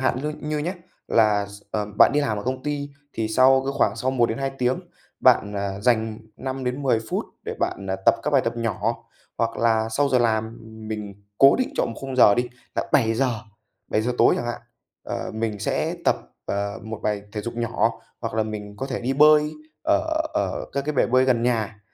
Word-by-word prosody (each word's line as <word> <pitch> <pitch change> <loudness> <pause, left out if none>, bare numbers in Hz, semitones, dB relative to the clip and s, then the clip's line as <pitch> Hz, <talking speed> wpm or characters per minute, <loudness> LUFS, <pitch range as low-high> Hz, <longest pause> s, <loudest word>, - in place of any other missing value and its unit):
hạn 130 -1 +1
như 150 0 -2
như 150 0 -2
nhá, 170 +5 -2 0.3
là 105 -3 +3
x 100 0 -12
à, 105 -1 0
bạn - - +8
đi 150 - +4
làm 110 -8 -1
ở - - -5
công 130 +1 -2
ty 145 -1 -3 0.2
thì 110 -1 -2
sau 130 +4 +5
cái 135 - -1
khoảng - - +2
sau 130 - 0
1-2 130 +1 0
tiếng 125 +1 +1 0.4
bạn, 105 0 +4
à, 100 0 -3
dành 110 -1 +1 0.2
5-10 130 -1 -1
phút - - -1 0.2
để - - -4
bạn, 100 - -2
à, 95 - 0
tập - - +7
các 150 - -1
bài 140 -2 +5
tập 115 0 -2
nhỏ, 115 0 -2 0.3
hoặc 115 0 0
là 110 -1 +2
sau 140 +6 +1
giờ 130 -1 +3
làm 110 -1 0 0.3
mình 105 -2 -5 0.2
cố 135 0 +7
định 255 - 0
chọn - - +2
1 115 - -6
khung 135 -1 -5
giờ 105 -5 +7
đi 120 +2 0 0.3
là - - -2
7:00, 120 -2 +2 0.5
7:00 110 +3 0
tối - - +6
chẳng 120 - -3
hạn, 120 0 -4 0.4
ờ, - - -4
mình 110 -1 -2
sẽ - - -1
tập, - - +4 0.3
ờ, 100 0 -2
1 110 -1 -6
bài 105 -1 -1
thể 105 - -3
dục 120 +3 -5
nhỏ, 115 -1 +1 0.3
hoặc 115 -2 -4
là 110 - +2
mình 105 -1 -6
có 135 - -4
thể 130 -2 -3
đi 125 +3 -1
bơi 150 +1 +5 0.3
ở 100 - +3 0.3
ở - - -1
các 140 0 -2
cái 150 - -1
bể - - +3
bơi 130 +2 +4
gần 125 -3 +2
nhà, 115 -3 0
115 Hz, 210 wpm, -24 LUFS, 110-130 Hz, 0.5 s, bạn